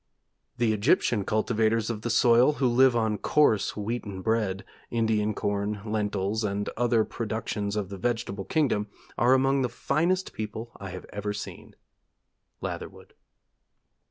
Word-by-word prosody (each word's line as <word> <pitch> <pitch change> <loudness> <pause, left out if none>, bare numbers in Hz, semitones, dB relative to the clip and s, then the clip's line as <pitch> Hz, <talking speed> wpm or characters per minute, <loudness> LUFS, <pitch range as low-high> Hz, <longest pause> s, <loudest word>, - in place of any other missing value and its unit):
'The 115 -2 +2
Egyptian 110 - +2
cultivators 110 +1 +1
of 110 -2 -5
the 120 - -3
soil, 120 +4 +5
who 140 -3 +1
live 125 +1 +5
on 110 -2 +1
coarse 145 -11 +2
wheaten 105 -3 -4
bread, 105 -4 0 0.2
Indian 110 -2 +1
corn, 100 +1 -1
lentils, 105 0 -1
and 100 0 -1
other 120 -2 +2
productions 105 -2 -3
of 100 -3 -2
the 100 -1 -7
vegetable 115 -3 -2
kingdom, 130 -10 +1 0.3
are 125 +2 +4
among 135 +1 +2
the 125 - 0
finest 170 +9 0
people 110 +2 -5
I 100 - -7
have 90 0 -8
even 105 0 -2
seen. 105 - -8 0.9
Latherwood.' - - -6
110 Hz, 135 wpm, -27 LUFS, 105-120 Hz, 0.9 s, soil